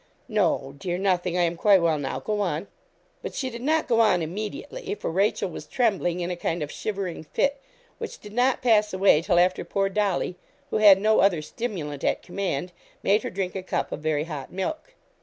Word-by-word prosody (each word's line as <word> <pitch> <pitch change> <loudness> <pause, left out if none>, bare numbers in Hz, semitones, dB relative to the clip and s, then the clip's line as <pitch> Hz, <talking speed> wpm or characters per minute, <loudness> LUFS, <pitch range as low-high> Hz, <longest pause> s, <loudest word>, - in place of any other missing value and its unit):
'No, 175 - 0
dear 175 +3 -2
nothing 180 -2 0
I 175 - +3
am 170 0 0
quite 195 +2 +5
well 165 -3 +2
now 135 -2 -3
go 210 +9 -2
on.' 175 -2 -1 0.6
But - - -6
she 260 -2 -2
did 235 0 -7
not 310 +4 +1
go 230 -2 +2
on 195 -7 +4
immediately, 220 - -5
for - - -4
Rachel 195 +2 +1
was 175 - -8
trembling 195 -7 0
in 175 +1 -2
a - - -2
kind 170 -1 -2
of 145 - -6
shivering 195 -6 -4
fit, 280 - 0 0.4
which - - -6
did 210 0 -12
not 250 +2 +2
pass 210 -4 +3
away 190 -5 +5
till 175 0 +1
after 180 +1 +3
poor 195 +3 0
Dolly, 195 -3 0 0.3
who - - +1
had 205 -3 +8
no 215 +2 +3
other 180 -6 +3
stimulant 155 - -5
at - - 0
command, 180 -3 -3 0.3
made 210 +2 +3
her - - -4
drink 185 -1 -3
a 190 - -2
cup 185 - -2
of - - -4
very 155 -1 0
hot 150 -4 -7
milk. 315 - -4
190 Hz, 205 wpm, -25 LUFS, 170-215 Hz, 0.6 s, had